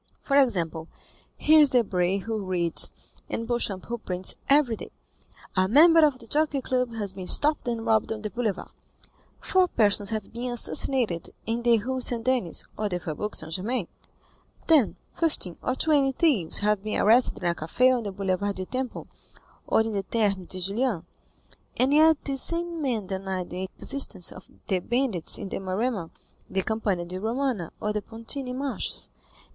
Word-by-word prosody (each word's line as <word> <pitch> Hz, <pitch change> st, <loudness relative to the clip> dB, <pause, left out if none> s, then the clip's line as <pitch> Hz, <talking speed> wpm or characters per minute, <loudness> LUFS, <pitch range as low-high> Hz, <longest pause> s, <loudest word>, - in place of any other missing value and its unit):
For 275 Hz, -, -2 dB
example, 170 Hz, -, +2 dB, 0.5 s
here 310 Hz, +1 st, +5 dB
is 295 Hz, -2 st, +7 dB
Debray 195 Hz, -7 st, +1 dB
who 220 Hz, +2 st, -4 dB
reads, 175 Hz, -3 st, 0 dB, 0.2 s
and 230 Hz, -, -3 dB
Beauchamp 225 Hz, -6 st, -1 dB
who 235 Hz, 0 st, -5 dB
prints, 185 Hz, -3 st, -1 dB, 0.2 s
every 275 Hz, -5 st, +4 dB
day, -, -, -8 dB, 0.7 s
'A 185 Hz, 0 st, +3 dB
member 325 Hz, -, +6 dB
of 290 Hz, -4 st, +3 dB
the 235 Hz, -, -10 dB
Jockey 295 Hz, +3 st, +1 dB
Club 250 Hz, -2 st, -2 dB
has 205 Hz, -4 st, -3 dB
been 185 Hz, -1 st, -7 dB
stopped 300 Hz, +3 st, +3 dB
and 230 Hz, -1 st, -2 dB
robbed 220 Hz, -1 st, +1 dB
on 220 Hz, -1 st, -5 dB
the 210 Hz, -, -4 dB
Boulevard;' 225 Hz, -6 st, -3 dB, 0.7 s
'four 370 Hz, -1 st, +2 dB
persons 205 Hz, -, +3 dB
have 220 Hz, -2 st, -4 dB
been 245 Hz, +2 st, -4 dB
assassinated 240 Hz, -6 st, +1 dB, 0.2 s
in 230 Hz, +2 st, -2 dB
the 235 Hz, -1 st, +4 dB
Rue 255 Hz, +4 st, -3 dB
St. 240 Hz, -2 st, +2 dB
Denis' 250 Hz, -10 st, +1 dB
or 210 Hz, -1 st, -2 dB
'the 180 Hz, -2 st, -2 dB
Faubourg 170 Hz, +6 st, -5 dB
St. 160 Hz, +1 st, -4 dB
Germain;' 205 Hz, +2 st, -2 dB, 0.8 s
'ten, 300 Hz, -9 st, +3 dB, 0.2 s
fifteen, 300 Hz, -, +1 dB
or 255 Hz, -, -1 dB
twenty 280 Hz, -3 st, +2 dB
thieves, 255 Hz, -, +2 dB
have 210 Hz, -1 st, +1 dB
been 215 Hz, +1 st, -3 dB
arrested 230 Hz, -1 st, +3 dB
in 175 Hz, -, +2 dB
a -, -, -2 dB
café 250 Hz, +12 st, +2 dB
on 245 Hz, -, -2 dB
the 205 Hz, -3 st, -5 dB
Boulevard 195 Hz, +1 st, -2 dB
du 185 Hz, -, -4 dB
Temple, 255 Hz, +3 st, -4 dB, 0.6 s
or -, -, +3 dB
in 220 Hz, 0 st, -2 dB
the 200 Hz, -, -1 dB
Thermes 195 Hz, -3 st, -1 dB
de 185 Hz, -, -5 dB
Julien,'—and 220 Hz, -, -3 dB
yet 315 Hz, +1 st, +6 dB
these 270 Hz, -2 st, -1 dB
same 340 Hz, -1 st, -2 dB
men 240 Hz, -8 st, -1 dB
deny 190 Hz, -1 st, -4 dB
the 185 Hz, +1 st, -6 dB
existence 220 Hz, -10 st, 0 dB
of -, -, -13 dB, 0.2 s
the 190 Hz, -, 0 dB
bandits 235 Hz, -4 st, +2 dB
in 200 Hz, -, -6 dB
the -, -, -4 dB
Maremma, 195 Hz, -1 st, -2 dB, 0.4 s
the 190 Hz, 0 st, -1 dB
Campagna 205 Hz, -5 st, -1 dB
di 180 Hz, +2 st, -6 dB
Romana, 230 Hz, -, -2 dB
or 210 Hz, 0 st, -2 dB
the 210 Hz, -, -2 dB
Pontine 250 Hz, +4 st, -5 dB
Marshes. 275 Hz, 0 st, -3 dB
225 Hz, 175 wpm, -26 LUFS, 190-255 Hz, 0.8 s, is